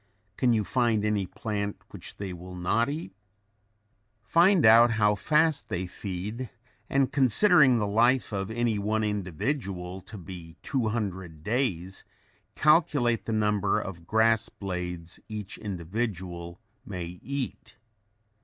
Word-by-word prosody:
Can 125 -2 +2
you 110 -2 +2
find 110 +1 +1
any 105 -3 0
plant 100 +1 -4
which - - -10
they 100 -2 -5
will 90 +1 -9
not 105 +8 +1
eat? 145 -10 -5 1.1
Find 170 - +4
out 115 +2 +8
how 105 -1 +3
fast 150 +8 +1
they 90 +1 -2
feed 100 +7 -5 0.4
and 135 -1 +2
considering 140 - +5
the 105 - 0
life 120 +6 +2
of 100 -1 -3
any 115 -2 0
one 110 +2 0
individual 100 - -3
to 105 - -11
be 85 -2 -10
200 100 - -3
days, 100 -6 -2 0.5
calculate 145 - +3
the 115 - -3
number 105 -2 +1
of 85 -3 -8
grass 110 0 +3
blades 90 -3 -5
each 105 -2 -6
individual 90 -3 -4 0.2
may 90 -3 -6
eat. 140 -2 -5
105 Hz, 125 wpm, -27 LUFS, 90-120 Hz, 1.1 s, out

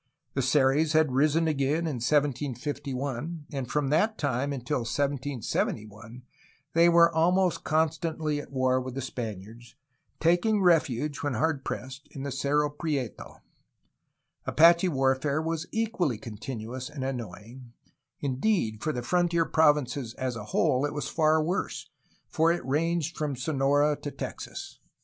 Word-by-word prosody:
The 135 - 0
Seris 140 +3 +3
had 155 -3 +3
risen 155 +5 +2
again 150 +2 0
in 150 -6 -2
1751, 140 +2 -2
and 135 -4 -4
from 150 -2 0
that 215 +8 +2
time 140 0 -1
until 140 +1 -2
1771 120 -4 -3 0.5
they 170 +1 +6
were 170 0 +6
almost 180 +3 +2
con 160 +1 +2
stantly 155 -1 -3
at - - -14
war 130 -1 +1
with 130 0 -6
the 135 - -3
Spaniards, 115 -2 -7 0.4
taking 175 +6 +3
refuge, 150 -5 +2
when 145 -3 -2
hard 150 +1 0
pressed, 130 +2 -6
in 135 - -5
the 140 - -3
Cerro 145 +2 +1
Prieto. 145 -6 -4 1.1
Apache 170 +3 +5
warfare 135 0 +1
was 165 +1 -2
equally 220 - 0
continuous 115 +3 -6
and 145 -3 -6
annoying; 120 -1 -7 0.5
indeed, 130 - 0
for 155 - 0
the 125 -4 -4
frontier 170 +3 +2
provinces 145 -7 +2
as 130 -2 -3
a 105 -2 -6
whole 130 +4 +1
it 145 0 -2
was 145 - -3
far 155 -1 +3
worse, 155 -3 -3 0.5
as 165 +1 +5
it 150 - -10
ranged 165 +4 0
from 150 -3 -2
Sonora 145 +2 +2
to 145 - -4
Texas. - - -7
145 Hz, 140 wpm, -28 LUFS, 130-160 Hz, 1.1 s, they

